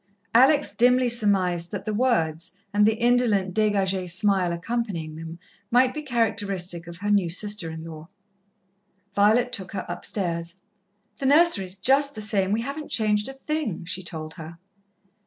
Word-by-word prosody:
Alex 275 Hz, +5 st, +4 dB
dimly 250 Hz, +1 st, +4 dB
surmised 190 Hz, -7 st, +1 dB
that 200 Hz, -1 st, -6 dB
the 215 Hz, -, -2 dB
words, 185 Hz, -8 st, 0 dB, 0.2 s
and 210 Hz, +1 st, +4 dB
the 220 Hz, -, +2 dB
indolent, 230 Hz, -5 st, +2 dB
dégagée 195 Hz, -3 st, +1 dB
smile 185 Hz, 0 st, +2 dB
accompanying 170 Hz, -3 st, -3 dB
them, 165 Hz, +1 st, -8 dB, 0.3 s
might 250 Hz, +1 st, +3 dB
be 305 Hz, -, -5 dB
characteristic 200 Hz, -, -2 dB
of 170 Hz, 0 st, -9 dB
her 205 Hz, +2 st, -2 dB
new 200 Hz, -4 st, +2 dB
sister 205 Hz, 0 st, -2 dB
in 160 Hz, 0 st, -7 dB
law. 160 Hz, -1 st, -10 dB, 1.1 s
Violet 220 Hz, +5 st, +3 dB
took 195 Hz, -4 st, -5 dB
her 190 Hz, -, -4 dB
upstairs. 170 Hz, -3 st, -3 dB, 0.6 s
"The 270 Hz, -, -1 dB
nursery 295 Hz, -, +4 dB
is 185 Hz, 0 st, -5 dB
just 275 Hz, +8 st, +2 dB
the 215 Hz, -, -6 dB
same 200 Hz, -3 st, 0 dB
we 220 Hz, +2 st, +1 dB
haven't 280 Hz, +5 st, -6 dB
changed 210 Hz, -2 st, +1 dB
a -, -, -7 dB
thing," 270 Hz, -, -4 dB
she 180 Hz, +2 st, -3 dB
told 160 Hz, -3 st, -6 dB
her. 165 Hz, -1 st, -10 dB
205 Hz, 155 wpm, -24 LUFS, 175-240 Hz, 1.1 s, Alex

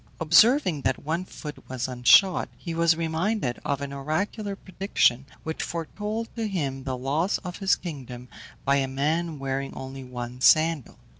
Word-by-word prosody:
Observing 180 Hz, -, +5 dB
that 130 Hz, -1 st, +1 dB
one 165 Hz, +4 st, -1 dB
foot 150 Hz, -5 st, -10 dB
was 130 Hz, -1 st, -2 dB
unshod, 130 Hz, +10 st, +5 dB
he 170 Hz, -, -6 dB
was 165 Hz, 0 st, +3 dB
reminded 165 Hz, -, -1 dB
of 140 Hz, -1 st, -1 dB
an 140 Hz, 0 st, -5 dB
oracular 195 Hz, +9 st, -2 dB
prediction 180 Hz, -, +1 dB, 0.2 s
which 160 Hz, 0 st, -4 dB
foretold 210 Hz, +7 st, -4 dB
to 225 Hz, -2 st, -2 dB
him 140 Hz, -9 st, -3 dB
the 130 Hz, -2 st, -2 dB
loss 145 Hz, +9 st, 0 dB
of 180 Hz, -1 st, -6 dB
his 195 Hz, -2 st, +3 dB
kingdom 130 Hz, -7 st, -8 dB, 0.4 s
by 140 Hz, +1 st, +4 dB
a 135 Hz, -1 st, +1 dB
man 155 Hz, +4 st, -1 dB
wearing 135 Hz, 0 st, -3 dB
only 135 Hz, 0 st, -7 dB
one 125 Hz, 0 st, -7 dB
sandal. 155 Hz, -2 st, +4 dB
155 Hz, 155 wpm, -26 LUFS, 135-180 Hz, 0.4 s, Observing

